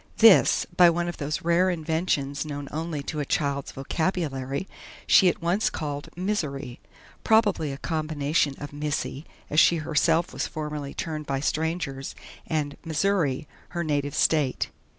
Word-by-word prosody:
This, 225 -4 +6
by 175 -1 +8
one 170 +1 0
of 175 - -4
those 150 +2 -3
rare 170 +2 +3
inventions 160 -4 -1
known 145 -2 -6
only 160 -2 -3
to 155 +2 -4
a - - 0
child's 140 -1 -1
vocabulary, 140 0 -2 0.4
she 185 - +6
at 170 - -4
once 180 +6 +2
called 145 -2 -5
"Misery" 150 -10 -3 0.4
probably 205 -9 +3
a 135 - -5
combination 155 -2 0
of 145 0 -8
"Missy," 145 0 -3 0.2
as 150 - +4
she 170 - +6
herself 165 +1 +1
was - - -2
formerly 150 -2 -5
termed 155 -2 -4
by 135 -1 -1
strangers, 155 -2 -2 0.3
and 150 -3 -2
"Missouri," 160 -4 0 0.2
her 170 -1 -3
native 145 -2 -1
State. 150 -5 +2
155 Hz, 145 wpm, -26 LUFS, 145-170 Hz, 0.4 s, by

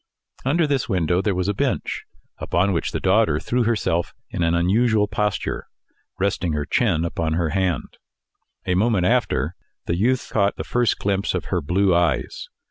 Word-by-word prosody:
Under 155 +6 +2
this 140 -5 -1
window 90 -2 +1
there 100 -2 0
was 90 0 -1
a 100 - +1
bench, - - -2 0.3
upon 95 +3 +1
which 85 - -1
the - - -2
daughter - - +3
threw 125 -1 0
herself 105 -7 0 0.2
in - - -3
an 85 0 +2
unusual 105 +5 +2
posture, 105 -1 -2 0.5
resting 95 -4 0
her 75 -1 -1
chin 85 -7 +1
upon 80 -1 -1
her 85 -1 0
hand. 95 -4 -2 0.7
A 90 - +1
moment 100 -1 +2
after, - - +1 0.3
the 85 - 0
youth 120 +7 0
caught 100 -2 +2
the - - -5
first 120 -3 +1
glimpse 100 -1 -1
of 90 - -3
her 90 - +1
blue 90 +5 +2
eyes. 85 -5 0
95 Hz, 170 wpm, -22 LUFS, 85-110 Hz, 0.7 s, daughter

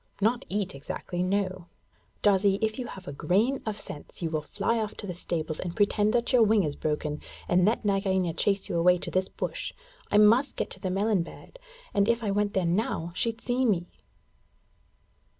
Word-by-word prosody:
'Not 225 +4 +1
eat 200 -1 -1
exactly; 160 +5 -5
no. 185 -1 -1 0.6
Darzee, 195 -1 +4
if 220 +2 -1
you 245 - -3
have 190 -4 -10
a 140 - -5
grain 215 - +1
of 215 -1 -2
sense 150 -1 -9
you 165 - -1
will 155 -1 0
fly 210 +8 -1
off 215 -1 -3
to - - -6
the 185 - -4
stables 160 -2 -3
and 175 -2 -4
pretend 210 0 +3
that 240 +1 +1
your 250 - +6
wing 215 -2 +5
is 145 -3 -2
broken, 150 -1 -2 0.3
and 180 0 +4
let 220 +1 +1
Nagaina 190 -3 +1
chase 195 +4 +1
you 170 - -1
away 180 +1 +5
to - - -4
this 185 0 0
bush! - - -3 0.4
I 205 - +3
must 230 +6 +5
get - - -3
to - - -5
the 185 - -2
melon 200 +1 +2
bed, 335 - -10 0.3
and 200 +2 +3
if 235 0 +2
I 205 - 0
went 205 0 0
there 190 -2 +2
now 170 -2 0
she'd 230 +4 -1
see 250 +1 0
me.' 180 -8 +1
195 Hz, 200 wpm, -28 LUFS, 175-220 Hz, 0.6 s, your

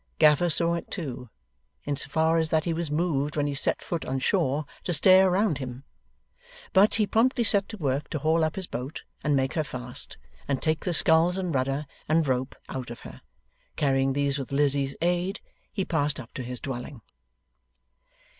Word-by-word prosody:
Gaffer 155 +3 +5
saw 170 +1 +4
it, 170 - -4
too, 130 - -6 0.5
in 145 - -2
so 135 - -5
far 160 +3 +2
as 160 -1 0
that 160 0 +1
he 170 - 0
was 165 -1 -2
moved 150 -2 0
when 145 -1 +1
he 145 - -1
set 140 - 0
foot 170 -2 -3
on 135 - -2
shore, 150 -1 +1 0.2
to 175 - -1
stare 185 +4 +6
around 185 -4 +1
him. 130 0 -7 0.9
But, 195 +3 +5
he 215 - +3
promptly 240 +4 +2
set 200 -2 +2
to 220 - -7
work 140 -4 -1
to - - -2
haul 160 +3 +2
up 155 0 -1
his 190 - -2
boat, 135 -1 -6 0.2
and 145 -1 +2
make 135 0 0
her 155 - 0
fast, 125 -3 -6 0.3
and 140 -2 0
take 155 0 -1
the 180 - 0
sculls 165 +3 +4
and 180 -3 -2
rudder 135 +2 -1 0.2
and 160 -1 +3
rope 130 0 -1
out 130 -3 -6
of 120 - -9
her. - - -11 0.5
Carrying 135 -1 +1
these 140 0 0
with 135 - -6
Lizzie's 140 -1 +1
aid, 180 +3 0 0.3
he 190 -3 -2
passed 150 -4 0
up 115 -3 -10
to - - -5
his 125 0 -4
dwelling. 130 -1 -6
150 Hz, 190 wpm, -26 LUFS, 135-170 Hz, 0.9 s, stare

